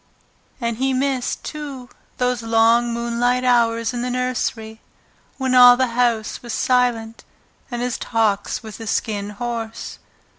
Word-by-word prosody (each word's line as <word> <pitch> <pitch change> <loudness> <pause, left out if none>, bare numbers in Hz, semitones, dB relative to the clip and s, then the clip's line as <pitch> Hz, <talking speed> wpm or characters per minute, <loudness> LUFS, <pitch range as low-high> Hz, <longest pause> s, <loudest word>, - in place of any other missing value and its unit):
And 235 -2 -2
he 265 +1 0
missed, 265 -1 -1
too, 285 -5 -7 0.3
those 250 -1 0
long 230 +1 +3
moonlight 235 +2 0
hours 230 -2 +2
in 240 - -3
the 250 - -2
nursery, 240 -3 -3 0.6
when 260 -1 -1
all 245 -1 +8
the 260 -1 +1
house 235 -3 0
was 240 -2 -6
silent, 240 -3 0 0.5
and 240 -1 -3
his 250 0 -2
talks 220 -3 0
with 220 0 -9
the 225 - -7
Skin 205 -2 -2
Horse. 230 +1 -5
240 Hz, 140 wpm, -21 LUFS, 225-250 Hz, 0.6 s, all